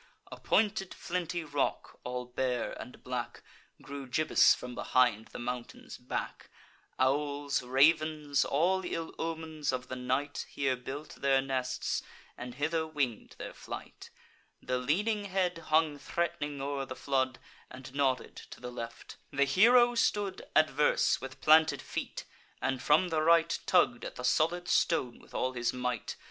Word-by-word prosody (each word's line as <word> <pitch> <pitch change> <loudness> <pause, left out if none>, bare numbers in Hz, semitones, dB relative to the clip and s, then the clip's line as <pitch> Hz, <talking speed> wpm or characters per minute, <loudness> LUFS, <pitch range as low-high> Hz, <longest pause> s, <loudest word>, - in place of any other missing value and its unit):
A - - -8
pointed 205 -3 +1
flinty 175 -1 -3
rock, 145 -2 -2
all 125 0 -4
bare 125 -1 -1
and 125 - -11
black, 125 -1 -4 0.4
Grew 140 -1 -7
gibbous 155 +5 +4
from 125 0 -8
behind 120 -3 +2
the - - -9
mountain's 125 0 -6
back; 125 - -5 0.5
Owls, 145 +1 +1
ravens, 150 +2 +3
all 180 +7 +2
ill 165 -2 -4
omens 160 -3 -2
of 130 0 -4
the 130 - -3
night, 130 +3 -2
Here 135 -2 0
built 135 +4 -7
their 135 -1 +3
nests, 130 -1 -1 0.3
and 125 0 -8
hither 160 +3 0
wing'd 140 -8 -2
their - - -7
flight. - - -9 0.5
The 125 0 -2
leaning 205 - 0
head 185 -3 0
hung 155 -2 +2
threat'ning 145 -1 -2
o'er 135 0 -3
the 130 - -6
flood, 130 -2 0 0.3
And 130 +1 -10
nodded 135 -2 0
to - - -11
the 125 0 -7
left. 115 -1 -8
The 140 0 +2
hero 240 - +6
stood 205 -4 0
Adverse, 155 -1 +3
with 130 0 -8
planted 160 +1 +6
feet, - - -5 0.3
and, 130 -1 -1
from 160 +5 +4
the 160 -2 +1
right, 165 +1 +4
Tugg'd 120 -9 +3
at - - -6
the 125 - -7
solid 165 +7 +2
stone 130 -10 +1
with - - -17
all 130 0 0
his 120 -1 -1
might. 125 -2 -3
140 Hz, 150 wpm, -31 LUFS, 125-160 Hz, 0.5 s, hero